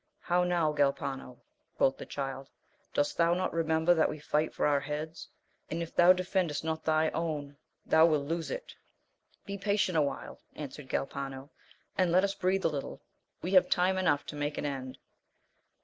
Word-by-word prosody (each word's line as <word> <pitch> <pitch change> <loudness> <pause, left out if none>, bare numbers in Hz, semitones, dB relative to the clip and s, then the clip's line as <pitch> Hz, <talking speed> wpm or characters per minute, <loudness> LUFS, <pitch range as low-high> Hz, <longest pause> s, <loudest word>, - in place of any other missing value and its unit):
How 180 +1 +2
now 170 -4 +1
Galpano? 140 -3 -1 0.4
quoth 135 - +3
the - - -7
Child, 135 -1 -5 0.4
dost 145 - 0
thou 170 0 +4
not 185 +1 -1
remember 160 +1 +3
that 160 -2 +3
we - - -5
fight 150 +1 0
for - - -1
our 145 -1 +3
heads, 150 +3 -5 0.4
and 165 +2 -2
if 165 - -10
thou 175 +1 +7
defendest 185 -4 0
not 160 0 -2
thy 155 0 +2
own 150 -4 -3 0.3
thou 160 +1 +6
wilt 150 -3 +1
lose 165 +2 -2
it! - - -6 0.7
Be 200 0 -5
patient 200 -2 +1
awhile, 145 -2 -3
answered 145 -2 -8
Galpano, 135 +1 -4 0.5
and 180 -2 +3
let 185 +2 +5
us 200 0 +1
breathe 190 0 0
a - - +7
little, 145 -3 -5 0.4
we 180 - -2
have 185 -2 +6
time 185 +1 +2
enough 155 -6 +2
to - - -7
make 145 0 -2
an, - - -2
end. 130 -2 -4
160 Hz, 175 wpm, -30 LUFS, 145-180 Hz, 0.7 s, thou